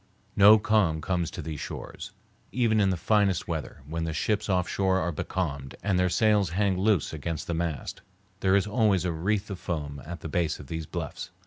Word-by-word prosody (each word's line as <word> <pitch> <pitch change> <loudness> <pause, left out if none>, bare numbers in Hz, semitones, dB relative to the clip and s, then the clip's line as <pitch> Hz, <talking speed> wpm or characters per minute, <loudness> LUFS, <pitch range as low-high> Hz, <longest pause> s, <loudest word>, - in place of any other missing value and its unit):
No 105 +2 +8
calm 105 -7 +2
comes 85 0 -1
to - - -7
these 80 -3 -5
shores. 95 +6 -7 0.4
Even 115 -3 +2
in 100 -2 +4
the 95 - 0
finest 100 0 +2
weather, 80 -5 -5
when 80 +2 -3
the 80 -1 -2
ships 105 +7 -1
off 90 -2 +2
shore 95 -1 +1
are 90 - -1
becalmed 75 -5 -3
and 100 -3 +1
their 90 0 +3
sails 105 -2 +3
hang 95 +2 +1
loose 95 -4 +1
against 80 +1 -4
the 85 - -3
mast, 80 -2 -3 0.4
there 95 0 +3
is 100 - +3
always 105 -4 +2
a 90 - +1
wreath 100 +5 -1
of 95 - -5
foam 75 -4 -4
at 85 0 -7
the - - -5
base 80 0 0
of - - -9
these 80 +2 -5
bluffs. - - -5
90 Hz, 205 wpm, -27 LUFS, 80-100 Hz, 0.4 s, No